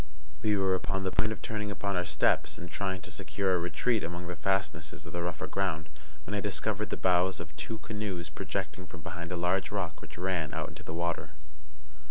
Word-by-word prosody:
We 105 -1 +4
were 95 -1 +4
upon 95 +1 0
the 95 - +1
point 110 +3 +3
of 110 - -5
turning 105 -1 -1
upon 100 -1 -1
our 90 0 +1
steps, - - +3
and 85 - -6
trying 95 0 0
to - - -7
secure 95 -2 +1
a 90 - +4
retreat 110 +6 +2
among 85 +2 -3
the 90 0 -3
fastnesses 95 +4 0
of - - -8
the 85 - 0
rougher 85 -1 -1
ground, 80 -5 0 0.4
when 105 - -4
I 105 - +2
discovered 105 +1 0
the - - -1
bows 90 0 +4
of 85 -3 -7
two 110 +8 -3
canoes 105 -6 -3
projecting 90 +4 -3
from 85 - -9
behind 85 +2 -4
a 90 - 0
large 90 +2 +2
rock 95 -6 -2
which 80 - -9
ran 90 -3 0
out - - -1
into - - -9
the 80 - -5
water. 85 -2 -1
95 Hz, 215 wpm, -32 LUFS, 85-100 Hz, 0.4 s, We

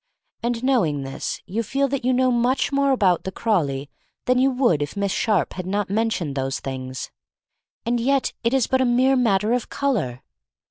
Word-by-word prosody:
And 235 0 -2
knowing 180 - +1
this 135 0 -5
you 215 +5 -2
feel 275 +5 0
that 275 -1 -2
you 255 - +2
know 255 0 +3
much 245 +4 +1
more 280 0 +2
about 195 -10 +3
the 190 - -4
Craw 215 0 +1
ley 140 -2 -3 0.4
than 250 0 +3
you 265 +1 +4
would 250 - +2
if 145 +6 -4
Miss 200 -1 0
Sharpe 210 -3 +1
had 185 -1 -6
not 200 0 -1
mentioned 215 -8 0
those 135 0 -2
things. 130 -1 -6 0.7
And 240 +1 +1
yet 270 +3 +1
it 230 - +2
is 265 -3 +2
but 260 0 +1
a - - +3
mere 255 +2 +3
matter 220 -3 +2
of 245 -2 -1
color! 205 - -1
230 Hz, 195 wpm, -23 LUFS, 175-255 Hz, 0.7 s, you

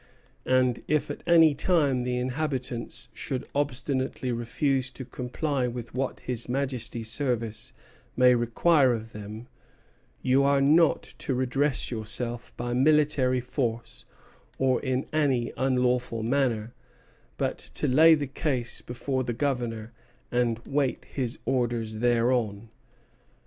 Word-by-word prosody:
And 130 -2 +2
if 150 -1 +1
at - - -7
any 165 -3 +6
time 145 -4 +2
the 125 0 -1
inhabitants 130 -2 -3
should 130 0 -4
obstinately 130 -2 -1
refuse 130 +3 0
to 130 0 -9
comply 125 +2 -2
with 120 -1 -6
what 130 +1 -3
His 120 -1 -4
Majesty's 125 -4 -1
service 120 -6 -1 0.5
may 125 0 +6
require 125 +4 +3
of 115 -1 -5
them, 105 +3 -8 0.7
you 130 +2 +3
are 140 0 +3
not 155 +4 +4 0.2
to 135 - -2
redress 130 +3 0
yourself 115 +2 -4
by 120 0 -3
military 135 -2 +3
force 120 -2 -3 0.5
or 130 -1 +2
in 130 -1 -1
any 135 -6 +1
unlawful 125 -3 0
manner, 120 -3 0 0.6
but - - -1 0.2
to - - -1
lay 160 +5 +7
the 145 -2 -2
case 135 -3 -2
before 130 +2 -3
the 120 -1 -2
Governor 120 -4 -2 0.4
and 120 -2 +1
wait 140 -2 -1
his 125 -4 -3
orders 120 -3 -1
thereon." 115 -2 +1
125 Hz, 125 wpm, -27 LUFS, 120-140 Hz, 0.7 s, lay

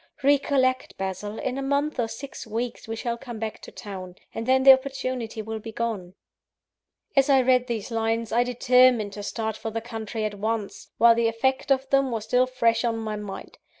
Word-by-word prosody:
Recollect, 270 -2 +2
Basil, 195 +3 -4
in 260 +1 -3
a - - -3
month 280 +1 0
or 235 - +1
six 255 +2 -8
weeks 230 +2 -4
we 225 - -3
shall 235 +1 -3
come 240 -3 -8
back 220 0 -4
to - - -11
town; 185 -3 -8 0.2
and 225 +1 -5
then 260 0 +4
the 270 0 +11
opportunity 255 -4 -3
will 220 0 -5
be 225 +1 -8
gone." 210 -6 -4 1.0
As 275 +1 +4
I 270 -1 +6
read 250 0 +3
these 230 -2 -4
lines, 225 0 -1
I 235 +2 +3
determined 250 -3 +3
to 205 - -6
start 220 +1 -3
for 225 - -5
the 225 +1 -3
country 225 -1 -5
at 210 - -2
once, 215 0 -3
while 235 0 +7
the 230 0 +2
effect 260 +5 0
of 265 0 +2
them 275 -1 +3
was 225 -3 -3
still 250 +3 +2
fresh 235 -2 +1
on 230 -1 0
my 220 -1 -3
mind. 205 -2 -8
230 Hz, 200 wpm, -25 LUFS, 220-255 Hz, 1.0 s, the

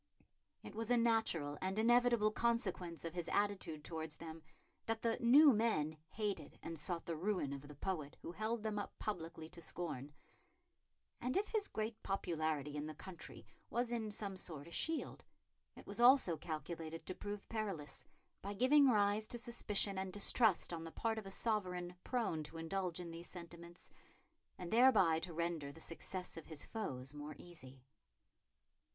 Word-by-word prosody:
It - - -8
was 225 +1 -3
a 245 - +5
natural 220 -11 +2
and 190 +2 -1
inevitable 235 -1 +5
consequence 190 -8 0
of 165 - -4
his 175 -2 -3
attitude 190 -7 0
towards 160 -2 -4
them 165 0 -8 0.5
that 225 0 -1
the 230 -1 +1
"new 275 +4 +8
men" 210 -9 +1
hated 210 -2 -3
and 165 -1 -4
sought 170 +2 -1
the 165 - -2
ruin 175 -4 0
of 140 +1 -7
the 150 - -10
poet 155 -2 -3
who - - -4
held 215 +4 -2
them 215 -1 -1
up 205 - -6
publicly 165 -5 -4
to 175 0 -11
scorn; 150 -5 -4 1.1
and 250 +6 0
if 415 +1 +1
his 430 -2 0
great 220 +1 -3
popularity 155 -6 -1
in 150 +1 -3
the 155 - -6
country 185 +2 -9 0.2
was 240 0 0
in 225 -3 -1
some 200 -2 -2
sort 155 -5 -3
a - - -11
shield, 325 - -1 0.5
it - - -12
was - - -4
also 245 -8 +7
calculated 165 0 -5
to 185 - -3
prove 205 +1 -6
perilous, 195 -11 -4 0.4
by 200 +1 -4
giving 270 +5 +6
rise 210 -1 +3
to 240 - 0
suspicion 210 -4 +1
and 190 0 -3
distrust 205 -1 +4
on 165 -1 -4
the 165 - -6
part 225 +3 -1
of 205 - -8
a - - -5
sovereign 180 -4 -1
prone 230 -11 0
to 155 +2 -8
indulge 175 +1 -2
in 175 -2 -6
these 170 +1 -8
sentiments, 170 0 -10 0.7
and 180 +1 -5
thereby 225 -10 +6
to 175 +2 -4
render 165 -3 -2
the 160 - -13
success 180 +3 -4
of 165 - -8
his 155 -3 -5
foes 135 - -4
more 150 0 -7
easy. 135 -7 -12
185 Hz, 170 wpm, -38 LUFS, 160-220 Hz, 1.1 s, new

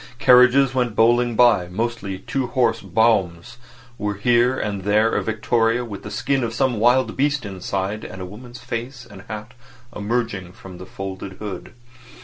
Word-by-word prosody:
Carriages 125 +1 +5
went 125 -4 -1
bowling 120 +1 +3
by, 120 -7 +4
mostly 105 0 -3
two 130 +6 -3
horse 120 -2 +1
broughams, 110 0 0 0.4
with 105 -1 -3
here 120 +2 +3
and 100 -2 -3
there 105 +3 +3
a - - +1
victoria 115 +2 0
with 100 -4 -8
the - - -8
skin 130 +6 -1
of 115 0 -3
some 130 -5 0
wild 125 +3 +3
beast 140 -2 0
inside 95 +2 -4
and 95 - -8
a 95 - -5
woman's 120 +6 -11
face 125 +2 -6
and 100 -5 -13
hat 110 +3 -7 0.4
emerging 105 -3 -2
above 95 -2 -11
the 95 - -10
folded 95 0 -7
hood. 100 0 -8
115 Hz, 160 wpm, -21 LUFS, 100-120 Hz, 0.4 s, Carriages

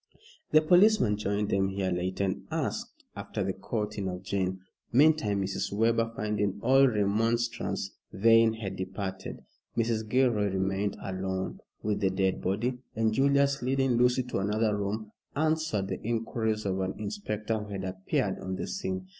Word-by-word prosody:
The 155 0 +5
policeman 180 - +5
joined 105 0 -1
them 95 0 +2
here 95 -1 -1
later, 90 +2 -1
and 95 -1 -2
asked - - -3
after - - -4
the - - -1
courting 105 -3 -3
of 90 0 -6
Jane. 95 -1 -1 0.3
Meantime 125 -8 +4
Mrs. 95 +1 -2
Webber, 115 +2 +2
finding 105 -2 -1
all 135 +3 +6
remonstrance 115 -1 0 0.2
vain, 115 +2 +5
had 100 -4 -5
departed. 95 0 -5 0.3
Mrs. 110 -2 0
Gilroy 120 -5 +3
remained 95 +1 -1
alone 95 0 -3 0.2
with 105 -1 0
the 100 -2 +2
dead 95 0 0
body, 120 +7 -1 0.2
and 110 0 +2
Julius, 140 +2 +3
leading 135 +1 +1
Lucy 125 +1 +3
to 125 -5 -3
another 105 +2 +1
room, 105 +1 -3 0.2
answered 155 -10 0
the - - -4
inquiries 110 -1 -1
of 95 -1 0
an 95 0 -2
inspector 105 +1 -3
who 105 0 -8
had 95 -1 -4
appeared 95 0 -1
on 95 0 -4
the - - -3
scene. 190 -1 -4
105 Hz, 155 wpm, -29 LUFS, 95-120 Hz, 0.3 s, all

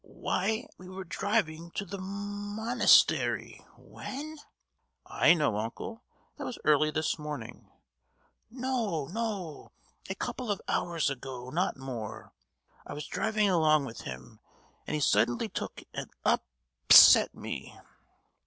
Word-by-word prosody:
"Why, 220 +5 -2
we 180 0 -11
were 190 +1 -7
driving 170 -3 -1
to 200 - -2
the 200 +1 -7
mo—nastery, 205 +4 +2
when?——" 300 +3 -8 0.7
"I 170 - +4
know, 145 -10 +1
uncle: 120 - -5 0.4
that - - -6
was 250 - -5
early 155 0 +4
this 155 +1 -1
morning!" 145 -6 -7 0.8
"No, 235 - -2
no! 195 -5 -5 0.4
A 190 - -2
couple 245 +3 -5
of 205 - 0
hours 165 -4 0
ago, 130 -1 -7
not 180 +1 0
more! 110 -5 -7 0.5
I - - -8
was 150 +1 -6
driving 215 -1 0
along 155 -5 +3
with 115 -4 -8
him, 65 -1 -9 0.5
and - - -2
he - - 0
suddenly 120 -3 +2
took - - -6
and - - -5 0.2
up—set - - +6
me!" - - -7
170 Hz, 125 wpm, -29 LUFS, 135-210 Hz, 0.8 s, up—set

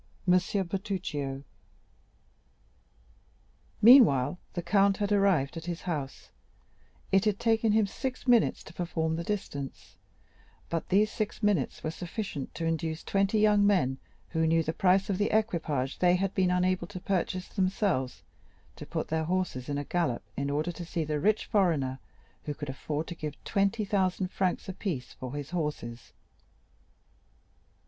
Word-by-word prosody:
Monsieur 185 +2 +2
Bertuccio 170 -8 -3 2.4
Meanwhile 180 - +7
the 175 - -3
count 195 +2 +3
had 205 -1 -1
arrived 190 -9 +3
at 165 - -6
his 175 -1 -4
house; 150 -7 -4 0.8
it 195 +2 +4
had 210 -2 +1
taken 225 -1 +2
him 220 -1 +4
six 255 +6 -5
minutes 240 -2 +4
to 155 - -13
perform 165 -2 -1
the 170 - -3
distance, 155 -8 -5 0.7
but 165 -1 -2
these 210 +3 +3
six 215 +1 -4
minutes 200 -11 +1
were 155 - -1
sufficient 175 - -5
to 165 - -3
induce 160 0 -2
twenty 195 +2 +1
young 210 -1 +5
men 135 -10 +2 0.3
who 160 -1 +1
knew 165 0 +3
the 160 - -2
price 190 +2 +3
of 195 -1 -1
the 205 - +2
equipage 165 - 0
they 180 0 +4
had 195 +1 -1
been 185 -2 +2
unable 180 +1 +1
to 200 -2 -7
purchase 185 -1 -1
themselves, 185 - 0 0.5
to - - -9
put - - -3
their 160 0 0
horses 175 -8 -2
in 145 - -1
a 145 - -2
gallop 160 - -1
in 140 0 -2
order 150 +4 -1
to 175 +1 -7
see 165 -1 -2
the 150 -1 -2
rich 215 +7 +2
foreigner 150 -10 +1 0.5
who 150 - -3
could 145 -1 -6
afford 150 +3 -3
to 175 - -6
give 150 -3 -5
20,000 195 -3 0
francs 185 -2 -1
apiece 180 - -4
for 130 +1 -7
his 145 +1 -6
horses. 150 -9 -4
180 Hz, 150 wpm, -29 LUFS, 150-200 Hz, 2.4 s, Meanwhile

